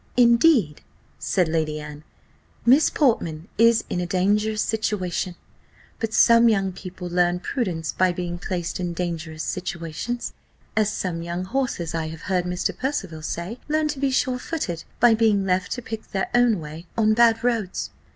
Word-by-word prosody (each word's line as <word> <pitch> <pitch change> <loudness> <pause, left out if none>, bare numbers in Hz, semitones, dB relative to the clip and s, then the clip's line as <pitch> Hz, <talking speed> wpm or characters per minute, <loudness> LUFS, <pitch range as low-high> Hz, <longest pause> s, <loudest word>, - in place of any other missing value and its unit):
"Indeed," 235 - +4 0.4
said 180 -3 +1
Lady 155 -1 -1
Anne, 150 0 -9 0.6
"Miss 270 +6 +6
Portman 175 - 0
is 230 0 +5
in 180 - -2
a 175 - -2
dangerous 210 +4 +1
situation; 185 -5 -2 0.6
but 225 -1 -2
some 230 +1 +6
young 195 -3 +1
people 185 -1 -8
learn 175 0 +2
prudence 180 -6 -2
by 185 -1 +3
being 175 -1 -4
placed 175 -1 -3
in 175 -1 -2
dangerous 165 -2 -4
situations, 185 +6 -4 0.4
as 215 -1 +2
some 180 -5 -3
young 170 +2 -4
horses, 235 - -2
I 165 -1 -2
have 160 0 -8
heard 180 -2 0
Mr. 180 0 -2
Percival 195 - -3
say, 175 +9 -5
learn 310 0 +2
to 290 -2 -4
be 275 0 +1
sure 255 -1 0
footed, 210 - -4
by 240 -1 +6
being 215 -3 +3
left 180 -1 0
to 245 - -6
pick 225 -1 -6
their 195 - -2
own 240 -4 +4
way 160 +2 -9
on 215 -1 +4
bad 230 0 +4
roads." 230 -6 -1
190 Hz, 160 wpm, -24 LUFS, 170-230 Hz, 0.6 s, Miss